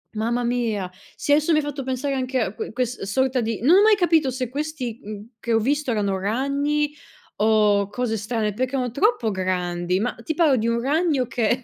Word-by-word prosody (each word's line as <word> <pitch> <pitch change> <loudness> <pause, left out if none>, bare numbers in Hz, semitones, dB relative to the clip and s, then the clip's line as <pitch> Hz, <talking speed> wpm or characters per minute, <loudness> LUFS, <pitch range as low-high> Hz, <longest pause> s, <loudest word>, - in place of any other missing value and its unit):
Mamma 235 +3 0
mia, 225 -6 -1 0.2
sì 290 - +1
adesso 310 +2 +3
mi - - +4
hai - - -2
fatto 290 -1 -4
pensare 265 +2 -2
anche 260 -1 -1
a 215 -4 -1
que - - -6
ques 250 +1 -2
sorta 255 +6 0
di 225 -1 -2
non 330 +8 +6
ho 400 - +6
mai 430 0 +6
capito 325 -7 +2
se 255 -1 -3
questi, 275 -4 -4
mhmm, 210 0 -7
che 230 +1 -2
ho - - +5
visto 285 +4 0
erano 200 -3 0
ragni, 280 +7 0 0.4
o 210 -2 +3
cose 225 0 -2
strane, 215 0 -2
perché 255 +4 -2
erano 250 -3 -1
troppo 280 - +1
grandi, 180 -1 -1
ma 245 +4 -1
ti 315 - -3
parlo 315 -6 +4
di 225 +1 0
un 235 0 +1
ragno 290 -1 +1
che 240 +1 0
245 Hz, 205 wpm, -23 LUFS, 215-280 Hz, 0.4 s, non